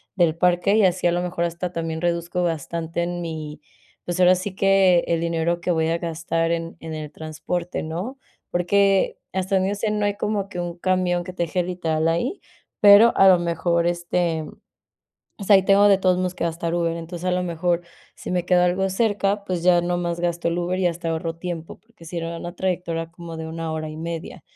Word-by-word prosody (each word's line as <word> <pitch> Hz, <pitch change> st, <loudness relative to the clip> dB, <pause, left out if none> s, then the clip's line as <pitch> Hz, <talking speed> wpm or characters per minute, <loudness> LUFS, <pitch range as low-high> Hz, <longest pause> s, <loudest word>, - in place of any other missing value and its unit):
del 170 Hz, -4 st, +3 dB
parque, 180 Hz, +3 st, +2 dB
y 220 Hz, -, +4 dB
así, 180 Hz, -1 st, +2 dB
a -, -, +3 dB
lo 175 Hz, -, 0 dB
mejor, 175 Hz, -1 st, -2 dB
hasta 170 Hz, +1 st, -4 dB
también 165 Hz, -2 st, -4 dB
reduzco 175 Hz, +1 st, -1 dB
bastante 165 Hz, 0 st, -2 dB
en 175 Hz, 0 st, -3 dB
mi 155 Hz, -3 st, -6 dB, 0.4 s
pues, 175 Hz, 0 st, -4 dB
ahora 180 Hz, 0 st, +6 dB
sí 185 Hz, +1 st, -5 dB
que 195 Hz, -3 st, +4 dB
el 165 Hz, -1 st, 0 dB
dinero 170 Hz, +1 st, 0 dB
que 180 Hz, -, 0 dB
voy 160 Hz, -1 st, +1 dB
a 165 Hz, +1 st, +1 dB
gastar 165 Hz, 0 st, -1 dB
en 165 Hz, 0 st, -3 dB
en 160 Hz, -1 st, -7 dB
el 155 Hz, -1 st, -6 dB
transporte, 160 Hz, +3 st, -4 dB
¿no? 180 Hz, -, -5 dB, 0.3 s
Porque 195 Hz, +2 st, +2 dB
hasta 190 Hz, +1 st, -1 dB
donde 190 Hz, 0 st, +2 dB
yo 205 Hz, -, -1 dB
sé, 210 Hz, +1 st, -1 dB
no 210 Hz, -1 st, 0 dB
hay 205 Hz, 0 st, 0 dB
como 205 Hz, -2 st, -2 dB
que 180 Hz, -, -6 dB
un 175 Hz, 0 st, -4 dB
camión 180 Hz, -1 st, 0 dB
que 185 Hz, -, -8 dB
te 175 Hz, -, -1 dB
deje 175 Hz, +2 st, -1 dB
literal 165 Hz, -3 st, -1 dB
ahí, 170 Hz, -, -1 dB, 0.4 s
pero 205 Hz, +3 st, +8 dB
a 195 Hz, -, +6 dB
lo 185 Hz, -, +7 dB
mejor, 170 Hz, 0 st, 0 dB
este, 175 Hz, -1 st, -1 dB
mm -, -, -9 dB, 0.9 s
O 200 Hz, -, -6 dB
sea, 200 Hz, 0 st, +7 dB
y -, -, +1 dB
tengo 200 Hz, +1 st, +5 dB
de 195 Hz, -1 st, +5 dB
todos 185 Hz, -1 st, +2 dB
modos 185 Hz, 0 st, -1 dB
que -, -, -3 dB
gastar 170 Hz, 0 st, -2 dB
Uber, 170 Hz, -1 st, 0 dB
entonces, 170 Hz, +1 st, -6 dB
a -, -, +2 dB
lo 180 Hz, 0 st, 0 dB
mejor, 175 Hz, 0 st, -1 dB, 0.3 s
si -, -, -8 dB
me 180 Hz, -1 st, -1 dB
queda 180 Hz, -1 st, +4 dB
algo 185 Hz, +2 st, +1 dB
cerca, 205 Hz, 0 st, 0 dB
pues, 185 Hz, -4 st, -3 dB
ya 175 Hz, -1 st, +4 dB
nomás 175 Hz, -1 st, -1 dB
gasto 170 Hz, -1 st, -1 dB
el 170 Hz, -, -1 dB
Uber 180 Hz, +1 st, -1 dB
y 185 Hz, -, +2 dB
hasta 170 Hz, -1 st, -2 dB
ahorro 165 Hz, 0 st, -2 dB
tiempo, 170 Hz, -2 st, -6 dB
porque 220 Hz, -7 st, -18 dB
sería 170 Hz, 0 st, -4 dB
una 175 Hz, +1 st, -7 dB
trayectoria 170 Hz, -3 st, -2 dB
como 170 Hz, -1 st, -9 dB
de 160 Hz, 0 st, -5 dB
1 165 Hz, 0 st, -5 dB
hora 155 Hz, 0 st, -4 dB
y 155 Hz, -, -9 dB
media. 165 Hz, 0 st, -6 dB
175 Hz, 215 wpm, -23 LUFS, 165-185 Hz, 0.9 s, pero